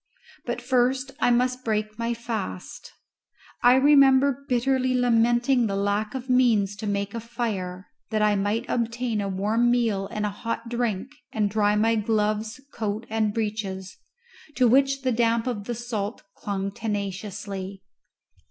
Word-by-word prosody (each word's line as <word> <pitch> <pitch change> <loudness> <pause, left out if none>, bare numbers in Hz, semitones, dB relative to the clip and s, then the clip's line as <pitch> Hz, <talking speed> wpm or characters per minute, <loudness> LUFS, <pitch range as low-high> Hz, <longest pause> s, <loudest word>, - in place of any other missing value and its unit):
But - - -3
first 260 +1 +1
I - - +3
must 250 +1 +1
break 215 -1 -2
my 235 0 -1
fast. 225 - -6 0.7
I 245 +1 +6
remember 275 -1 +5
bitterly 255 +1 +1
lamenting 240 +1 +3
the 195 - -2
lack 205 +3 -1
of 260 -1 -5
means 230 -6 +3
to 210 - -5
make 200 0 -2
a 230 - -3
fire, 205 -6 -4 0.2
that 215 -1 +1
I 210 -1 +3
might 205 +4 0
obtain 230 -1 -1
a 200 - -2
warm 215 +5 +1
meal 225 -5 +1
and 210 +1 -3
a 210 - -1
hot 230 +2 -5
drink 235 0 -2 0.2
and 215 -5 0
dry 210 0 +2
my 225 +2 +3
gloves, 215 +1 0
coat, 215 0 -3
and 220 -1 +1
breeches, 205 -3 -3 0.6
to 250 0 +4
which 275 +2 +3
the 255 - +1
damp 230 -1 +2
of 225 -6 -3
the 240 - -3
salt 225 -2 -4
clung 195 -1 -3
tenaciously. 200 -2 -5
225 Hz, 150 wpm, -25 LUFS, 205-245 Hz, 0.7 s, I